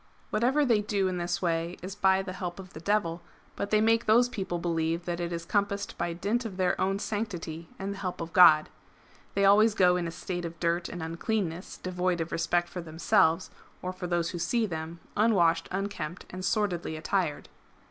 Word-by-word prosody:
Whatever 260 Hz, +7 st, +2 dB
they 230 Hz, -5 st, +3 dB
do 205 Hz, -2 st, 0 dB
in 180 Hz, -1 st, -2 dB
this 175 Hz, +1 st, -2 dB
way 170 Hz, 0 st, -1 dB
is 190 Hz, +1 st, -5 dB
by 190 Hz, -1 st, +3 dB
the 185 Hz, -1 st, -6 dB
help 175 Hz, -2 st, -5 dB
of 190 Hz, -1 st, -11 dB
the -, -, -8 dB
Devil, 170 Hz, -2 st, 0 dB, 0.3 s
but 200 Hz, -, -3 dB
they 215 Hz, -, +4 dB
make 225 Hz, +1 st, +3 dB
those 240 Hz, +3 st, +5 dB
people 190 Hz, -6 st, -3 dB
believe 165 Hz, 0 st, -1 dB
that 175 Hz, -1 st, -3 dB
it 170 Hz, 0 st, -2 dB
is 170 Hz, -1 st, -4 dB
compassed 200 Hz, 0 st, -1 dB
by 170 Hz, 0 st, -2 dB
dint 200 Hz, +8 st, -1 dB
of 205 Hz, -5 st, -6 dB
their 185 Hz, -2 st, +2 dB
own 195 Hz, +1 st, +1 dB
sanctity 195 Hz, -6 st, -4 dB
and 195 Hz, +1 st, -3 dB
the 200 Hz, -, -9 dB
help 185 Hz, -2 st, -4 dB
of 165 Hz, 0 st, -6 dB
God.^ 160 Hz, -4 st, +8 dB, 0.7 s
[They 200 Hz, -, +3 dB
always 210 Hz, +2 st, +6 dB
go 180 Hz, -1 st, +4 dB
in 175 Hz, -1 st, -2 dB
a -, -, -4 dB
state 175 Hz, +1 st, -5 dB
of 165 Hz, -1 st, -6 dB
dirt 170 Hz, 0 st, 0 dB
and 175 Hz, -2 st, -6 dB
uncleanness, 170 Hz, +1 st, -3 dB
devoid 180 Hz, -1 st, -1 dB
of 165 Hz, 0 st, -3 dB
respect 175 Hz, +1 st, +1 dB
for 180 Hz, +1 st, -6 dB
themselves, 165 Hz, +1 st, +2 dB, 0.3 s
or 185 Hz, 0 st, -3 dB
for 185 Hz, -1 st, -5 dB
those 170 Hz, -1 st, 0 dB
who 175 Hz, -, -5 dB
see 225 Hz, +7 st, +1 dB
them, 165 Hz, -2 st, -5 dB, 0.2 s
unwashed, 175 Hz, -7 st, +3 dB
unkempt, 195 Hz, -3 st, -4 dB
and 185 Hz, 0 st, -6 dB
sordidly 185 Hz, -6 st, 0 dB
attired. 155 Hz, -1 st, -1 dB
180 Hz, 200 wpm, -28 LUFS, 170-200 Hz, 0.7 s, God.^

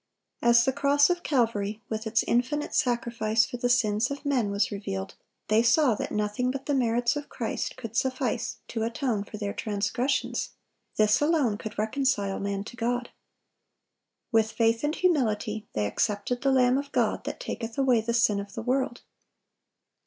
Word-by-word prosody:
As 235 Hz, 0 st, +5 dB
the 265 Hz, -, +1 dB
cross 285 Hz, +3 st, +4 dB
of 350 Hz, 0 st, -1 dB
Calvary, 225 Hz, -8 st, 0 dB
with 220 Hz, 0 st, -4 dB
its 225 Hz, +1 st, +2 dB
infinite 255 Hz, +5 st, 0 dB
sacrifice 235 Hz, -2 st, +1 dB
for 245 Hz, -, -6 dB
the 245 Hz, 0 st, 0 dB
sins 220 Hz, -1 st, +2 dB
of 280 Hz, +1 st, -6 dB
men, 255 Hz, -7 st, +1 dB
was 200 Hz, +1 st, 0 dB
revealed, 95 Hz, -, -4 dB, 0.3 s
they 215 Hz, +1 st, +4 dB
saw 250 Hz, +2 st, +4 dB
that -, -, -4 dB
nothing 210 Hz, +4 st, -1 dB
but 270 Hz, +1 st, -4 dB
the 290 Hz, -, 0 dB
merits 240 Hz, -1 st, +2 dB
of 290 Hz, 0 st, -5 dB
Christ 230 Hz, -3 st, -3 dB
could 230 Hz, -3 st, -7 dB
suffice 255 Hz, -2 st, -1 dB
to 225 Hz, -, -3 dB
atone 230 Hz, -1 st, -1 dB
for 210 Hz, -, -8 dB
their 205 Hz, -1 st, -3 dB
transgressions; 220 Hz, +6 st, -1 dB, 0.4 s
this 215 Hz, +3 st, +3 dB
alone 295 Hz, -8 st, +2 dB
could 215 Hz, 0 st, -7 dB
reconcile 215 Hz, -3 st, 0 dB
man 200 Hz, 0 st, -2 dB
to 225 Hz, -, -10 dB
God. 240 Hz, +1 st, -2 dB, 1.2 s
With 220 Hz, -1 st, +3 dB
faith 230 Hz, +1 st, +1 dB
and 300 Hz, +2 st, 0 dB
humility 220 Hz, -, 0 dB
they 105 Hz, -, 0 dB
accepted 210 Hz, -, -1 dB
the 275 Hz, -, +2 dB
Lamb 255 Hz, 0 st, +4 dB
of 280 Hz, 0 st, -7 dB
God, -, -, 0 dB
that -, -, -5 dB
taketh 230 Hz, -, -5 dB
away 255 Hz, -4 st, +3 dB
the 235 Hz, +1 st, -1 dB
sin 215 Hz, -3 st, +3 dB
of 200 Hz, 0 st, -7 dB
the 225 Hz, -, -4 dB
world. 255 Hz, 0 st, -1 dB
235 Hz, 170 wpm, -27 LUFS, 215-260 Hz, 1.2 s, As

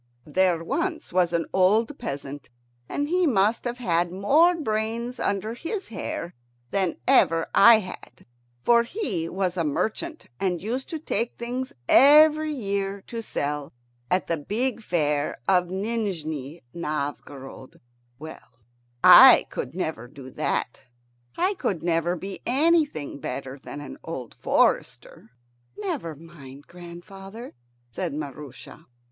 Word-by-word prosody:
There 175 Hz, +1 st, +1 dB
was 320 Hz, -, -3 dB
once 180 Hz, -2 st, +2 dB
an 170 Hz, -1 st, 0 dB
old 215 Hz, +9 st, +2 dB
peasant, 140 Hz, -, -6 dB, 0.4 s
and 290 Hz, -, -2 dB
he 360 Hz, +2 st, +2 dB
must 215 Hz, -2 st, +2 dB
have 240 Hz, 0 st, -3 dB
had 175 Hz, -7 st, 0 dB
more 290 Hz, -, +4 dB
brains 230 Hz, -3 st, -3 dB
under 205 Hz, +3 st, -1 dB
his 370 Hz, -, -5 dB
hair 180 Hz, -5 st, -5 dB, 0.4 s
than 190 Hz, -4 st, 0 dB
ever 165 Hz, 0 st, +4 dB
I 235 Hz, +3 st, +8 dB
had, 180 Hz, -9 st, -11 dB, 0.4 s
for 235 Hz, -1 st, +5 dB
he 235 Hz, -, -3 dB
was 185 Hz, -1 st, -2 dB
a 170 Hz, -, +1 dB
merchant, 220 Hz, -, -3 dB
and 180 Hz, -3 st, 0 dB
used 235 Hz, +9 st, -4 dB
to 320 Hz, -, -3 dB
take 235 Hz, -6 st, -3 dB
things 250 Hz, +2 st, -4 dB, 0.2 s
every 305 Hz, +2 st, +6 dB
year 200 Hz, -6 st, -3 dB
to 230 Hz, -1 st, -6 dB
sell 145 Hz, -7 st, -3 dB, 0.4 s
at 185 Hz, -, +1 dB
the 165 Hz, -, -1 dB
big 230 Hz, -, -2 dB
fair 150 Hz, -7 st, 0 dB
of 180 Hz, -2 st, +3 dB
Nijni 180 Hz, -, -4 dB
Novgorod. 145 Hz, -4 st, -6 dB, 0.4 s
Well, 160 Hz, +3 st, -12 dB, 0.5 s
I -, -, +9 dB
could 135 Hz, -, -5 dB
never 160 Hz, -9 st, -4 dB
do 130 Hz, -1 st, -12 dB
that. 120 Hz, -, -2 dB, 0.6 s
I 375 Hz, +3 st, +1 dB
could 190 Hz, -, -3 dB
never 170 Hz, 0 st, +1 dB
be 195 Hz, +3 st, -7 dB
anything 290 Hz, -, +1 dB
better 135 Hz, +1 st, -6 dB
than 145 Hz, -, -8 dB
an 145 Hz, -, -9 dB
old 130 Hz, -8 st, -7 dB
forester. -, -, 0 dB, 0.5 s
"Never 170 Hz, -6 st, -4 dB
mind, 145 Hz, -3 st, -13 dB
grandfather," 195 Hz, +6 st, -11 dB, 0.4 s
said 130 Hz, -, -4 dB
Maroosia. 145 Hz, +1 st, -9 dB
190 Hz, 130 wpm, -25 LUFS, 155-235 Hz, 0.6 s, I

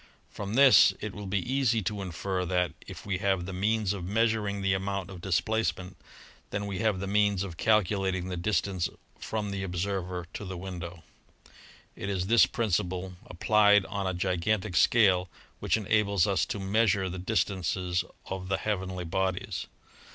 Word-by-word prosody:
From 100 Hz, +1 st, -5 dB
this 135 Hz, -1 st, +7 dB
it 105 Hz, -2 st, -5 dB
will 105 Hz, -1 st, -7 dB
be 100 Hz, +2 st, 0 dB, 0.2 s
easy 120 Hz, -5 st, +2 dB
to 100 Hz, +2 st, -3 dB
infer 90 Hz, +1 st, -3 dB
that, 90 Hz, -2 st, 0 dB, 0.2 s
if -, -, -9 dB
we 95 Hz, -3 st, -2 dB
have 95 Hz, -3 st, 0 dB
the 95 Hz, -, -6 dB
means 105 Hz, +1 st, +1 dB
of 95 Hz, -3 st, -6 dB
measuring 105 Hz, 0 st, 0 dB
the 95 Hz, -1 st, +2 dB
amount 95 Hz, 0 st, -3 dB
of 90 Hz, -2 st, -9 dB
displace 110 Hz, +5 st, 0 dB
ment, 90 Hz, +1 st, -9 dB, 0.5 s
then 100 Hz, 0 st, -3 dB
we 100 Hz, -2 st, -4 dB
have 110 Hz, -4 st, +1 dB
the 100 Hz, -, -3 dB
means 100 Hz, -1 st, +2 dB
of 95 Hz, -4 st, -6 dB
calculating 95 Hz, -2 st, +1 dB
the 90 Hz, -, -3 dB
distance 90 Hz, -1 st, 0 dB, 0.3 s
from 105 Hz, -2 st, -3 dB
the 100 Hz, -1 st, -3 dB
observer 90 Hz, -1 st, -3 dB
to -, -, -6 dB
the 95 Hz, -2 st, -6 dB
window. 85 Hz, -2 st, -7 dB, 0.9 s
It 100 Hz, -, -5 dB
is 95 Hz, -2 st, -1 dB
this 115 Hz, +4 st, +5 dB
principle 95 Hz, -4 st, -1 dB
applied 105 Hz, +2 st, +4 dB
on 100 Hz, -1 st, -3 dB
a 95 Hz, -, -1 dB
gigantic 95 Hz, +2 st, -1 dB
scale 95 Hz, -6 st, +4 dB, 0.3 s
which -, -, +1 dB
enables 105 Hz, -3 st, +2 dB
us 100 Hz, -2 st, +1 dB
to -, -, -3 dB
measure 100 Hz, -1 st, +2 dB
the 95 Hz, 0 st, -5 dB
distances 90 Hz, -3 st, 0 dB, 0.2 s
of 95 Hz, -1 st, -5 dB
the 95 Hz, -, 0 dB
heavenly 95 Hz, -4 st, -3 dB
bodies. 95 Hz, +2 st, -2 dB
95 Hz, 165 wpm, -28 LUFS, 90-105 Hz, 0.9 s, this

